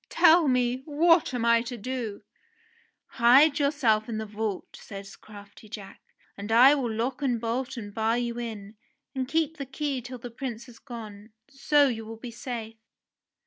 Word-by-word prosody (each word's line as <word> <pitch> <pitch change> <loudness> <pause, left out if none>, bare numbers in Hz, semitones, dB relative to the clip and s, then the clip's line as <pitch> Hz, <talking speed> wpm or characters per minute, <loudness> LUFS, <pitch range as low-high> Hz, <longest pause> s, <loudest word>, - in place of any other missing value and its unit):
"Tell 330 -1 +5
me, 250 0 +1
what 325 +2 +3
am 245 -2 -2
I 235 0 +5
to 245 +1 -6
do 230 -3 -5 0.4
?" 465 0 -36
"Hide 275 +6 +6
yourself 245 -7 +1
in 225 - -3
the 220 - -3
vault," 210 -1 -5
says 195 -1 -10
crafty 205 0 -14
Jack, 205 -3 -9 0.3
"and 205 +2 -7
I 250 +5 +8
will 260 -6 -1
lock 245 +5 -2
and 250 -4 0
bolt 240 +3 -3
and 205 -3 -7
bar 225 +2 +1
you 240 -1 -3
in, 215 -3 -7 0.4
and 260 -2 -3
keep 320 +2 0
the 280 - -5
key 270 -1 -3
till 250 +2 -8
the 245 0 -9
Prince 235 -1 -6
has 245 -3 -15
gone. 220 -4 -10 0.2
So 285 +1 +3
you 225 -3 -3
will 225 +1 -9
be 235 +1 -8
safe." 230 -2 -6
240 Hz, 180 wpm, -27 LUFS, 220-270 Hz, 0.4 s, I